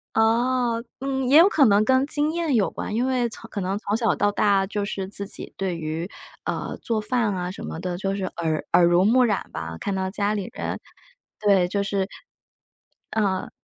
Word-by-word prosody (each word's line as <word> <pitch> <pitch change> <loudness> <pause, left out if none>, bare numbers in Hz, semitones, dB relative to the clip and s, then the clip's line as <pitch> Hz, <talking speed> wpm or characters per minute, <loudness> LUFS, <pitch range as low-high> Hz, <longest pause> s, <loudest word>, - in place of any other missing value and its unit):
哦， 235 +1 +2 0.2
嗯， 265 -1 -1
也 280 +4 +6
有 350 +4 +8
可 295 -8 +4
能 205 -1 +5
跟 260 +4 +3
经 295 +1 +2
验 330 -5 0
有 205 - +2
关， 210 - -4
因 245 +3 +1
为 255 -2 +1
从 220 - -9
可 - - -4
能 190 +1 -1
从 210 0 -1
小 225 -2 +2
到 205 0 +2
大 200 -2 +2
就 205 +1 -3
是 195 -2 -3
自 200 0 -4
己 - - -3
对 190 -2 -2
于 160 +3 -4 0.4
呃， - - -3
做 220 -2 -1
饭 225 -3 0
啊 180 0 -3
什 - - -9
么 - - -5
的， 180 -1 -3
就 195 +1 -2
是 195 - -4
耳 160 -2 -1
耳 175 0 +6
濡 175 +2 +4
目 250 +4 +5
染 210 -4 -1
吧。 80 0 -6
看 200 - -3
到 190 0 -1
家 205 +1 0
里 200 -3 -3
人 - - -4 0.6
对， 195 -4 +4
就 200 +2 -1
是 195 -1 -1 1.1
嗯， 190 -3 0
205 Hz, 220 characters per minute, -24 LUFS, 190-240 Hz, 1.1 s, 有